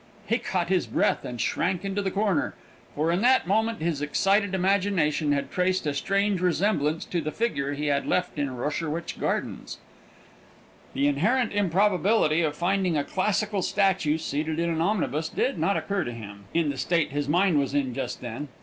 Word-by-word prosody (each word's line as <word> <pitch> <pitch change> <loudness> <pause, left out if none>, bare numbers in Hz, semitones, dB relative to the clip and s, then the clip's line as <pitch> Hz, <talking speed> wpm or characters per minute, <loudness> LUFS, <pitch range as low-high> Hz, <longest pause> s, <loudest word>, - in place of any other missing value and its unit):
He 230 +4 +1
caught 185 -6 -2
his 185 -2 +1
breath - - +1
and 120 -1 -6
shrank 180 - -1
into 195 +1 -1
the 195 - -1
corner; 195 -5 0 0.4
for 155 +3 +1
in 175 +3 +1
that 255 +2 +4
moment 220 +1 0
his 165 -4 -1
excited 195 +6 +1
imagination 185 -6 +1
had 140 -1 -1
traced 185 -1 0
a 145 - 0
strange 195 +6 0
resemblance 170 -4 +1
to 175 - -2
the 155 - -3
figure 145 -12 -1
he 150 +1 -3
had 140 -1 0
left 180 -4 0
in 140 -3 -2
Rosherwich 155 +5 -3
Gardens. - - -3 1.2
The 140 - +1
inherent 215 - +1
improbability 195 -3 +2
of 150 -2 0
finding 180 0 +1
a 145 - +1
classical 200 +4 0
statue 190 -6 +1
seated 155 0 -2
in 170 0 0
an 160 0 -1
omnibus 165 - 0
did 255 -9 -1
not 195 +5 +2
occur 200 -2 -1
to 120 - -4
him, 100 -3 -10
in 165 -3 +1
the 140 - -7
state 165 +3 +1
his 145 0 -2
mind 175 -1 +3
was 140 0 -1
in 135 -3 0
just 125 -1 -4
then. 120 +4 -5
170 Hz, 180 wpm, -26 LUFS, 145-195 Hz, 1.2 s, that